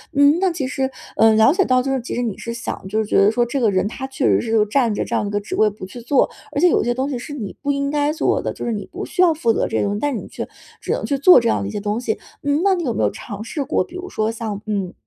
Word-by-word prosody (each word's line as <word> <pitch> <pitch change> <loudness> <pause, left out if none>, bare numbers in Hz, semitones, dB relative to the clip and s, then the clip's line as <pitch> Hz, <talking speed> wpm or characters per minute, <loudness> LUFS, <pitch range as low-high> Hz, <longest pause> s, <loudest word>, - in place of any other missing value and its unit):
嗯， 285 +3 +5
那 380 -2 +3
其 325 -5 -3
实 265 +1 -1 0.3
呃， 220 0 +6
了 220 +6 +5
解 385 +2 +3
到 255 0 +3
就 270 - -1
是 265 - -1
其 240 - -5
实 245 - -1
你 220 -5 -2
是 235 - -5
想， 235 -4 -5
就 205 +3 -3
是 220 - +1
觉 - - -2
得 200 - +6
说 240 +1 +1
这 255 +3 -2
个 225 - +4
人 190 0 +1
他 265 +5 -5
确 265 0 -2
实 - - +4
是 225 -2 +2
占 230 0 +1
着 - - -1
这 - - -3
样 - - +1
的 205 - -3
一 - - -6
个 205 - 0
职 205 - -5
位 215 - +4
不 205 -2 -9
去 240 +6 -10
做， 255 +4 +2 0.3
而 - - +1
且 360 - +5
有 - - +3
些 240 +1 0
东 260 +2 -1
西 265 -4 -3
是 255 - -8
你 215 -8 -6
不 285 - 0
应 280 0 -1
该 295 0 +1
做 315 - 0
的， - - -2
就 - - -6
是 235 - -1
你 210 -2 -4
不 380 +4 -5
需 - - -1
要 340 -3 +5
负 235 -7 +2
责 - - 0
这 - - -2
个 - - +1
东 200 0 0
西， 205 - -3
但 290 -4 0
你 - - -7
却 - - -6 0.3
只 - - -3
能 - - -2
去 280 - 0
做 355 +6 +8
这 235 -1 0
样 - - +1
的 100 - -3
一 - - -5
些 - - -3
东 210 +2 -2
西。 225 -3 -1 0.3
嗯， 285 +2 +1
那 395 -1 +4
你 350 - -3
有 245 -6 -1
没 - - -1
有 - - +2
尝 210 -1 -8
试 280 +6 -3
过， 275 - 0
比 350 - -14
如 365 +1 -6
说 220 -9 -1
像， 220 -3 -5
嗯， 200 -4 -2
240 Hz, 365 characters per minute, -20 LUFS, 215-285 Hz, 0.3 s, 做